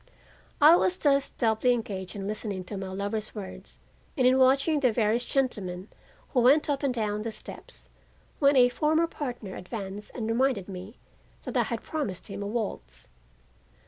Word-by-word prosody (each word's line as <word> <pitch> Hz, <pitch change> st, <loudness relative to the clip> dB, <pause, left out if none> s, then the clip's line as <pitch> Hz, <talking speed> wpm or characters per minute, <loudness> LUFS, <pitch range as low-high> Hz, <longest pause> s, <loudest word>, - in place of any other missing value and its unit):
I 305 Hz, +3 st, +8 dB
was 365 Hz, 0 st, +1 dB
thus 280 Hz, -2 st, +2 dB
doubly 230 Hz, +1 st, +2 dB
engaged 195 Hz, -6 st, -4 dB
in 195 Hz, -1 st, -5 dB
listening 205 Hz, -2 st, -4 dB
to 205 Hz, -, -7 dB
my 195 Hz, -1 st, -4 dB
lover's 205 Hz, +4 st, -4 dB
words 195 Hz, -3 st, -9 dB, 0.4 s
and 255 Hz, -, +3 dB
in 255 Hz, +1 st, +5 dB
watching 275 Hz, +4 st, +4 dB
the 255 Hz, -4 st, +3 dB
various 220 Hz, +1 st, +1 dB
gentlemen 205 Hz, -9 st, -2 dB, 0.4 s
who 255 Hz, -, +1 dB
went 270 Hz, +5 st, +5 dB
up 280 Hz, -, -1 dB
and 280 Hz, -2 st, +1 dB
down 210 Hz, -3 st, -1 dB
the 230 Hz, -, -3 dB
steps, 60 Hz, -, -9 dB, 0.5 s
when 280 Hz, 0 st, +5 dB
a 245 Hz, -1 st, +6 dB
former 315 Hz, +5 st, +2 dB
partner 245 Hz, -, -6 dB
advanced 200 Hz, +1 st, -6 dB
and 225 Hz, -3 st, -3 dB
reminded 230 Hz, -4 st, +1 dB
me 190 Hz, +3 st, -8 dB, 0.5 s
that -, -, -6 dB
I -, -, +4 dB
had -, -, -3 dB
promised 225 Hz, -, -4 dB
him 200 Hz, +1 st, -6 dB
a 200 Hz, -, -3 dB
waltz. 195 Hz, -, -5 dB
225 Hz, 170 wpm, -27 LUFS, 200-265 Hz, 0.5 s, I